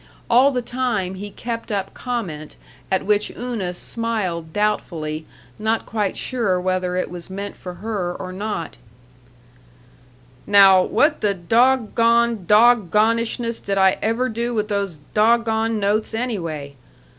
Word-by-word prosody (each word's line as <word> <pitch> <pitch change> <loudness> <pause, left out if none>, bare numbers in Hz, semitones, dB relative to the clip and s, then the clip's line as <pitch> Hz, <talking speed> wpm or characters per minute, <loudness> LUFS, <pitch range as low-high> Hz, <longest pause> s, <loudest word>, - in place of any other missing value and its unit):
All 255 +4 +6
the 250 -3 -2
time 235 -7 -2
he 200 +2 -7
kept 230 +2 -6
up 195 -1 -2
comment 185 -12 -5 0.4
at 190 - +1
which 210 +1 +2
Una 230 -7 -3
smiled 185 -7 -3
doubtfully, 160 -6 -2 0.3
not 220 +1 0
quite 210 -3 -2
sure 225 -8 0
whether 185 0 -1
it 180 - -2
was 175 -1 -8
meant 200 +1 -6
for 180 -1 -8
her 200 -3 -3
or 185 -1 -7
not: 200 -3 -4 1.7
"Now 195 -2 +7
what 295 - +2
the 205 -2 +1
doggone 230 +1 +2
doggonishness 230 +1 +3
did 195 -1 -1
I 190 -1 +4
ever 230 +4 0
do 235 +1 -3
with 210 0 -1
those 200 -5 -2 0.2
doggone 225 0 +2
notes, 210 +2 0
anyway? 170 - -3
210 Hz, 130 wpm, -21 LUFS, 185-230 Hz, 1.7 s, Now